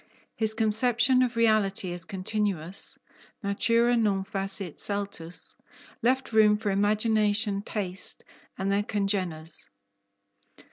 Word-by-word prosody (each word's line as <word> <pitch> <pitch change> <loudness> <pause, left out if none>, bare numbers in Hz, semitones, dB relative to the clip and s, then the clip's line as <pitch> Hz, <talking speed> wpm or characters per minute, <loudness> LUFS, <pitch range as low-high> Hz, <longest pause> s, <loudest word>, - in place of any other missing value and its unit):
His 220 -1 0
conception 240 +3 +3
of 250 -2 0
reality 210 -5 +2
as 175 - -1
continuous 195 -2 -3 0.5
(natura 230 +4 +2
non 205 -4 +1
facit 195 -4 0
saltus) 200 -4 -3 0.5
left 255 +1 +1
room 210 -1 +5
for 210 -1 -2
imagination, 210 0 +1
taste, 195 -3 -4 0.3
and 195 +1 -1
their 200 +1 +2
congeners. 190 -6 -2
205 Hz, 100 wpm, -27 LUFS, 195-220 Hz, 0.5 s, room